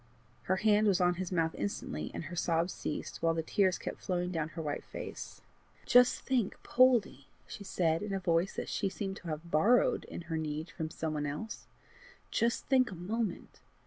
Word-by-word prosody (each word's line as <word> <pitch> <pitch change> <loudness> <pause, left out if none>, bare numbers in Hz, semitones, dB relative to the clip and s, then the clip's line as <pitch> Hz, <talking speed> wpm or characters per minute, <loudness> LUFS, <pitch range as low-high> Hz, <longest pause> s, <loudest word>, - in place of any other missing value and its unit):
Her 190 - +4
hand 210 +1 +4
was 195 -3 +3
on 180 -1 +4
his 185 - -4
mouth 165 -3 +1
instantly, 75 -6 -3
and - - -5
her 175 - -7
sobs 170 +1 +1
ceased, 150 - -5
while 165 0 +2
the 165 - -1
tears 185 +2 +2
kept - - -6
flowing 180 -1 -1
down 160 -3 -2
her - - -1
white 145 -1 -3
face. - - -8 0.4
"Just 245 0 +5
think, 245 -7 0
Poldie," 240 - +3 0.2
she 200 - -8
said, 165 -4 +1
in 210 -1 -4
a 195 - 0
voice 175 0 +1
which - - -3
she 195 - -1
seemed 195 0 -4
to 175 - -11
have 160 +2 -5
borrowed 225 +11 +4
in - - -7
her 165 -1 -3
need 155 +1 -3
from 160 -3 -4
some 160 -1 -3
one 150 -1 -1
else, 150 +10 -6 0.3
" - - -26 0.3
just 235 +1 +1
think 255 -3 +3
a 190 - -7
moment! 205 +3 -3
175 Hz, 200 wpm, -32 LUFS, 160-205 Hz, 0.4 s, Just